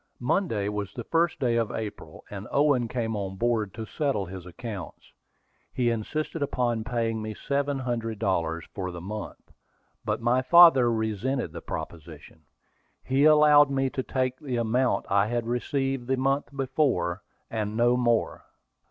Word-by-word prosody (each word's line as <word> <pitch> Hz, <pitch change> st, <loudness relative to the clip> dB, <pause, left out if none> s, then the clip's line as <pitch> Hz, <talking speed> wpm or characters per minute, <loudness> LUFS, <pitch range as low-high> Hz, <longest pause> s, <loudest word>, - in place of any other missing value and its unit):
Monday 120 Hz, -, 0 dB
was 105 Hz, -1 st, -3 dB
the 120 Hz, -, -7 dB
first 165 Hz, +5 st, +1 dB
day 120 Hz, -3 st, +1 dB
of 115 Hz, -2 st, 0 dB
April, 110 Hz, -2 st, -7 dB
and 100 Hz, +1 st, -7 dB
Owen 140 Hz, -4 st, +3 dB
came 115 Hz, -2 st, -2 dB
on 95 Hz, -2 st, -4 dB
board 110 Hz, -1 st, 0 dB
to 110 Hz, 0 st, -5 dB
settle 135 Hz, -7 st, -1 dB
his 90 Hz, -1 st, -9 dB
accounts. 100 Hz, 0 st, -8 dB, 0.6 s
He 120 Hz, -2 st, +1 dB
insisted 150 Hz, +8 st, -3 dB
upon 120 Hz, -5 st, 0 dB
paying 115 Hz, -1 st, -1 dB
me 110 Hz, 0 st, -5 dB
seven 140 Hz, +3 st, -1 dB
hundred 115 Hz, -4 st, -3 dB
dollars 85 Hz, -5 st, -1 dB
for 95 Hz, -2 st, -4 dB
the 85 Hz, -1 st, -7 dB
month; 105 Hz, +4 st, -8 dB, 0.5 s
but -, -, -1 dB
my 120 Hz, +2 st, +2 dB
father 135 Hz, -4 st, +7 dB
resented 110 Hz, -, -1 dB
the 85 Hz, 0 st, -8 dB
proposition. 80 Hz, -1 st, -8 dB, 0.6 s
He 135 Hz, +2 st, +2 dB
allowed 150 Hz, -1 st, +7 dB
me 135 Hz, -1 st, 0 dB
to 130 Hz, -, -2 dB
take 130 Hz, 0 st, -2 dB
the 130 Hz, -4 st, -4 dB
amount 120 Hz, +2 st, +1 dB
I 100 Hz, +1 st, +2 dB
had 120 Hz, 0 st, -1 dB
received 130 Hz, +2 st, -2 dB
the 130 Hz, 0 st, +1 dB
month 135 Hz, +2 st, +1 dB
before, 130 Hz, -, 0 dB, 0.3 s
and 110 Hz, -1 st, -2 dB
no 120 Hz, +1 st, +4 dB
more. 120 Hz, -2 st, 0 dB
120 Hz, 155 wpm, -27 LUFS, 105-135 Hz, 0.6 s, father